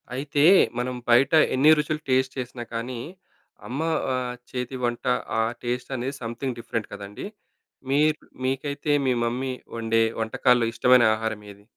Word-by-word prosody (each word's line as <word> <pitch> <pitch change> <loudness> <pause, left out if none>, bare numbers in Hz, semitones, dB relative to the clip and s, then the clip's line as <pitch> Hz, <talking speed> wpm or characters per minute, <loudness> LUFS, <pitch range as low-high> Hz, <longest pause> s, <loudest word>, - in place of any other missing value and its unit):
అయితే, 145 +1 0 0.3
మనం 125 +1 -2
బయట 130 +5 +5 0.2
ఎన్ని 145 +4 +6
రుచులు 150 +1 -1
టేస్ట్ 130 0 +1
చేసినా 125 -1 -5
కానీ, 120 +1 -4 0.7
అమ్మ 135 +5 -4 0.3
ఆహ్, 125 -1 -2 0.2
చేతి 125 +1 -4
వంట 120 +1 -2 0.3
ఆ - - +4 0.2
టేస్ట్ 125 +2 -3
అనేది 130 +3 -3
సమ్‌థింగ్ 120 +2 -4
డిఫరెంట్ 115 -2 -4
కదండీ! 100 - -7 0.6
మీ‌ర్ 150 +3 +3 0.3
మీకైతే 140 +3 -2 0.2
మీ 130 - +3
మమ్మీ 130 +2 -2 0.2
వండే 115 0 +2 0.2
వంటకాల్లో 120 +2 +2
ఇష్టమైన 125 0 +5
ఆహారం 110 -1 -3
ఏది? 100 0 -17
125 Hz, 140 wpm, -25 LUFS, 120-135 Hz, 0.7 s, ఎన్ని